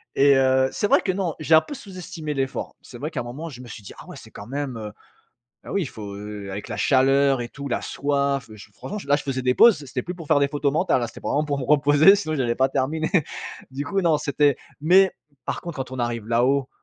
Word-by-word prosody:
et 140 0 +5
heu, 130 0 +3
c'est 205 - -1
vrai - - +4
que 190 - 0
non, 180 -5 -2
j'ai 160 +1 +4
un 160 - +7
peu 155 - -9
sous-estimé 185 - -7
l'effort. 135 -1 -3
C'est 120 - -12
vrai 150 +6 -5
qu'à - - -4
un - - -6
moment 145 +8 -7
je 125 -3 -10
me 125 - -11
suis 105 - -10
dit: - - -10
«Ah - - -12
ouais! - - -9
C'est - - -14
quand 100 - -10
même, 135 -2 -4
heu». 105 -1 -6 0.7
Ah - - -7
oui, 200 - +1
il 140 - -4
faut, 105 -2 -8
heu, 105 -1 -7
avec 100 +2 -6
la - - -5
chaleur 135 -1 +3
et 120 - -6
tout, 140 -1 -7
la - - -2
soif, 140 -2 -1
beh, 110 - -12
ch 100 - -14
franchement, 210 - -7
là, 145 +1 +4
je - - -5
faisais 130 -2 -3
des 125 0 +2
pauses, 200 -12 +5
c'était 125 0 -4
plus 180 - -6
pour 165 -3 -10
faire 150 -2 +4
des 140 - +3
photos 145 -1 -1
mentales, 155 -6 +1
hein, - - 0
c'était 115 - -12
vraiment 150 +2 0
pour 145 -1 -2
me 130 - -3
reposer, 150 +6 +6
sinon 155 -6 -3
j'allais 120 -4 0
pas 130 0 +2
terminer. 155 +6 -1 0.6
Du 140 +2 -4
coup, 195 +6 -1
non, 165 -3 +3
c'était 145 -1 +2 0.2
mais 185 +4 +5 0.3
par - - -3
contre, 170 -4 -7
quand 130 -1 -5
on 130 - -6
arrive 120 -2 -2
là-haut 130 +3 +2
140 Hz, 265 wpm, -23 LUFS, 125-155 Hz, 0.7 s, un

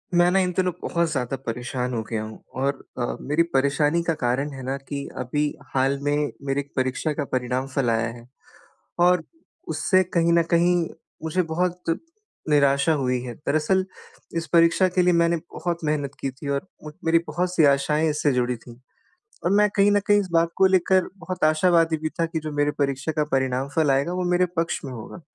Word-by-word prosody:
मैं 175 0 +5
न - - 0
इन 185 -1 +2
दिनों 185 -1 +2
बहुत 170 -1 0
ज़्यादा 130 -3 -2
परेशान 125 +2 -3
हो 115 - -1
गया 110 -2 -2
हूँ 110 0 -10 0.2
और 140 +1 +2 0.2
अ, 120 -1 -2
मेरी 150 +4 +2
परेशानी 145 +4 +2
का 165 - +1
कारण 130 +4 0
है 135 - -8
न 135 +1 -2
कि 140 -1 -4
अभी 140 +4 -1 0.3
हाल 135 +1 +2
में 145 0 0 0.2
मेरी 135 +1 0
एक 140 0 -6
परीक्षा 130 +4 -1
का 150 - -2
परिणाम 130 +1 -1
फल 135 -4 +1
आया 115 0 +1
है 120 -1 -13 0.8
और 180 -2 +3 0.4
उससे 175 +4 +2
कहीं 170 -2 +1
न 170 0 +4
कहीं 175 +1 +4 0.5
मुझे 160 +3 0
बहुत 180 -1 0 0.5
निराशा 140 +1 +4
हुई 125 -4 0
है। 125 -1 -6
दरअसल 155 +6 +1 0.5
इस 165 0 -3
परीक्षा 170 +2 +5
के 180 0 +1
लिए 180 0 +4
मैंने 170 0 +3 0.2
बहुत 175 -1 -2
मेहनत 150 -2 -1
की 135 - -1
थी 140 +2 -8
और 140 +6 -2 0.2
म 150 - -6
मेरी 165 +1 +4
बहुत 180 +1 -2
सी 165 - +4
आशाएँ 150 +3 +2
इससे 150 -1 +1
जुड़ी 125 0 0
थी। 120 +1 -14 0.7
और 175 - +2
मैं 210 0 +5
कहीं 200 0 +5
न 205 - +4
कहीं 205 0 +5
इस 195 - -4
बात 165 0 +3
को 190 - +5
लेकर 185 0 +3
बहुत 180 0 -3
आशावादी 165 +1 +3
भी 155 - 0
था 165 - +3
कि 165 0 -3
जो 155 0 -5
मेरी 145 0 +2
परीक्षा 140 +2 -1
का 150 -1 0
परिणाम 130 0 0
फल 155 -3 +3
आएगा 135 +5 +1
वो 180 0 -2
मेरे 180 +1 +3
पक्ष 165 0 0
में 135 - -6
होगा। 120 +9 -9
150 Hz, 200 wpm, -24 LUFS, 135-170 Hz, 0.8 s, मैं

